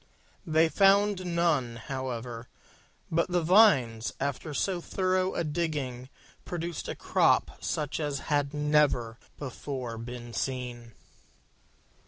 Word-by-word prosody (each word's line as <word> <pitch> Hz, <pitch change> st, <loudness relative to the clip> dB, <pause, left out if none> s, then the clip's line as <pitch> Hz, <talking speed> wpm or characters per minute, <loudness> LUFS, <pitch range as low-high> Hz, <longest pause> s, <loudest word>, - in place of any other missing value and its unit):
They 160 Hz, +1 st, +4 dB
found 195 Hz, +1 st, +3 dB
none, 150 Hz, -9 st, +1 dB
however: 120 Hz, -2 st, -5 dB, 0.6 s
but 170 Hz, +2 st, +1 dB
the 175 Hz, -1 st, +1 dB
vines, 150 Hz, -, +4 dB
after 140 Hz, +2 st, -3 dB
so 175 Hz, +4 st, -1 dB
thorough 185 Hz, +1 st, 0 dB
a -, -, 0 dB
digging, 145 Hz, -6 st, -3 dB, 0.3 s
produced 170 Hz, -2 st, -4 dB
a -, -, -3 dB
crop -, -, +2 dB
such 150 Hz, 0 st, -2 dB
as 145 Hz, -3 st, -2 dB
had 145 Hz, -2 st, 0 dB
never 150 Hz, -6 st, +1 dB, 0.2 s
before 130 Hz, -3 st, -5 dB
been 120 Hz, 0 st, -8 dB
seen. 120 Hz, -3 st, -4 dB
145 Hz, 110 wpm, -29 LUFS, 125-170 Hz, 0.6 s, They